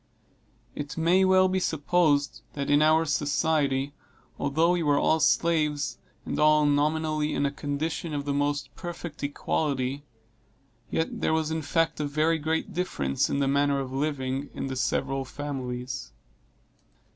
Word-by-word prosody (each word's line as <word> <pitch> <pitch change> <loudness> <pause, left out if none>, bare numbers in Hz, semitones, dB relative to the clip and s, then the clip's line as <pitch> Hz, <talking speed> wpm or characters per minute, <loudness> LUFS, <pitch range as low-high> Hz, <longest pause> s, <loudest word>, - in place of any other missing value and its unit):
It 145 +1 -6
may 175 +4 +4
well 185 0 +5
be 190 0 0
supposed, 155 -3 +1
that 140 0 -2
in 145 +1 +5
our 155 +1 +4
society, 145 -2 0 0.5
although 160 +5 +2
we 180 -1 +1
were 145 -3 +3
all 160 - +3
slaves, 150 +2 +1 0.3
and - - -3
all 150 0 +5
nominally 155 +1 +1
in 140 - +1
a 140 - 0
condition 150 +3 -3
of 145 -1 -3
the 145 - -1
most 145 -1 -1
perfect 175 -3 -7
equality, 140 -1 -1 0.9
yet 160 - -2
there - - +2
was 160 0 0
in 160 0 -1
fact 165 +2 0
a 150 - 0
very 155 +3 +1
great 160 +2 -2
difference 70 - -1
in - - 0
the 140 -1 +1
manner 140 0 +2
of 130 -1 -4
living, 135 -1 -2
in - - -3
the 135 -1 -4
several 135 +2 -1
families. 130 - -5
145 Hz, 150 wpm, -27 LUFS, 140-160 Hz, 0.9 s, well